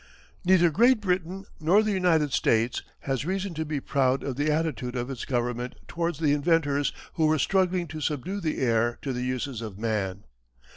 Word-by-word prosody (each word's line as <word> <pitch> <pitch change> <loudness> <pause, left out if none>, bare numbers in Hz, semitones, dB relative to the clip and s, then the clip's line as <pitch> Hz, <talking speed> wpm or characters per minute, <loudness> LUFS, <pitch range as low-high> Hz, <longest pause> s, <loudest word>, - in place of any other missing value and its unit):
Neither 175 -2 +5
Great 240 - +4
Britain 185 -1 -2
nor 180 +7 +4
the 215 - 0
United 165 -7 +2
States 115 +2 +2 0.2
has 135 -2 -2
reason 190 +2 -2
to 160 0 -2
be 150 -2 -3
proud 135 -1 +1
of 135 - -3
the 145 +3 0
attitude 150 -5 -1
of 125 +2 -3
its 130 - -5
government 120 0 -2
towards 170 -2 -2
the 150 -2 +2
inventors 145 -2 +2 0.3
who 160 -1 +3
were 155 0 +3
struggling 185 +2 +1
to 155 +1 -6
subdue 155 +7 -2
the 155 -3 -1
air 120 -2 +1
to 135 - -2
the 125 - -3
uses 125 -1 -3
of 105 -4 -7
man. 100 -3 -2
150 Hz, 185 wpm, -27 LUFS, 125-175 Hz, 0.3 s, Neither